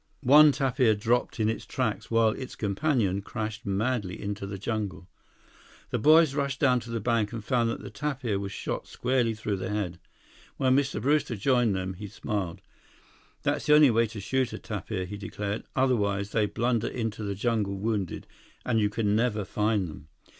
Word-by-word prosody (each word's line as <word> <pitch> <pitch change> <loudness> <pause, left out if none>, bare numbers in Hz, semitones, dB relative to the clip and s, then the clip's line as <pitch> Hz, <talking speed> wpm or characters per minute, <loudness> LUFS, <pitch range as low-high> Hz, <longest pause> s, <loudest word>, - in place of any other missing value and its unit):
One 150 +3 +8
tapir 130 -5 +2
dropped 115 +3 0
in 110 - +2
its 110 - -2
tracks, 110 -4 -2
while 115 -1 +4
its 130 +3 -7
companion 105 -2 0
crashed 110 0 -5
madly 100 -1 -1
into 100 -1 -4
the 100 0 -5
jungle. 105 -3 -4 0.8
The - - 0
boys 155 +3 +6
rushed 140 -1 -1
down 125 -3 +4
to 120 - -11
the 115 0 -2
bank 110 -1 0
and 115 -2 -5
found 120 -2 +2
that - - -4
the - - -8
tapir 135 -9 -2
was 100 0 -4
shot - - -4
squarely 125 -3 0
through 105 -2 -2
the 95 - -4
head. 100 -5 -3 0.6
When 130 -1 +3
Mr. 140 0 +1
Brewster 145 -3 +1
joined 120 -1 +2
them, 95 0 -3
he 100 +3 -8
smiled. 100 -4 -4 0.8
"That's - - -1
the 150 - +7
only 150 -4 +7
way 115 +1 +3
to 110 0 -8
shoot 130 +4 0
a - - -4
tapir," 100 -2 -4
he 100 +3 -7
declared. 105 +1 -4
"Otherwise, 105 -6 +1
they 105 -2 +2
blunder 115 +1 0
into 115 -3 -3
the 100 -1 -3
jungle 105 -2 0
wounded, 100 -3 -2 0.4
and 115 -3 +2
you 105 -1 +2
can 105 -1 0
never 110 -3 +1
find 105 -2 0
them. 75 -1 -10
110 Hz, 180 wpm, -27 LUFS, 100-125 Hz, 0.8 s, One